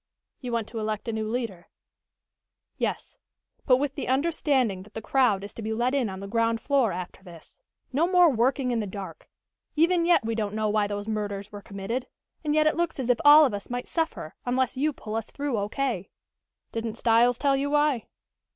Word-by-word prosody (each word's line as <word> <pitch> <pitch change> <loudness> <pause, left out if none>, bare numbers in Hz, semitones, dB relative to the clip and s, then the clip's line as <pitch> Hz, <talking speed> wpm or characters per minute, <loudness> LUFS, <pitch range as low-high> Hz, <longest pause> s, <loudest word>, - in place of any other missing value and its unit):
"You 250 -2 -5
want 230 -2 -1
to 230 - -5
elect 215 0 -3
a 230 - -1
new 220 0 -2
leader?" 225 -7 -4 1.1
"Yes. - - -3 0.5
But 255 -3 +6
with 280 0 -1
the 280 - -5
understanding 265 - +1
that 205 +3 -16
the - - -2
crowd 235 -8 +2
is 205 - -8
to - - -8
be 220 0 -2
let 240 +3 0
in 260 -6 +1
on 190 0 -7
the 200 - -6
ground 230 +1 +1
floor 265 -4 +2
after 180 +1 -6
this. 170 -4 -14 0.3
No 315 +6 +3
more 360 -1 +6
working 255 0 +1
in 235 - 0
the 210 - -2
dark. 195 0 -8 0.5
Even 335 +2 +3
yet 345 -10 +4
we 230 - -1
don't 210 -2 -2
know 215 -1 0
why 210 -1 +2
those 205 0 -4
murders 205 -2 -3
were 205 -1 -8
committed, 215 +7 -4 0.4
and 300 -1 0
yet 310 0 +4
it 310 - +3
looks 340 -4 -1
as 250 -1 +2
if 240 - +1
all 300 +1 +9
of 255 - -1
us 200 0 -6
might 245 0 -4
suffer, 320 - -2
unless 255 +1 0
you 295 +4 +1
pull 215 -6 -8
us 225 -1 -3
through 285 -3 -3
O.K." 210 -1 -2 0.6
"Didn't 225 -1 -3
Styles 235 +1 +4
tell 280 -1 +2
you 275 +1 -1
why?" 295 -5 +2
235 Hz, 205 wpm, -26 LUFS, 210-275 Hz, 1.1 s, all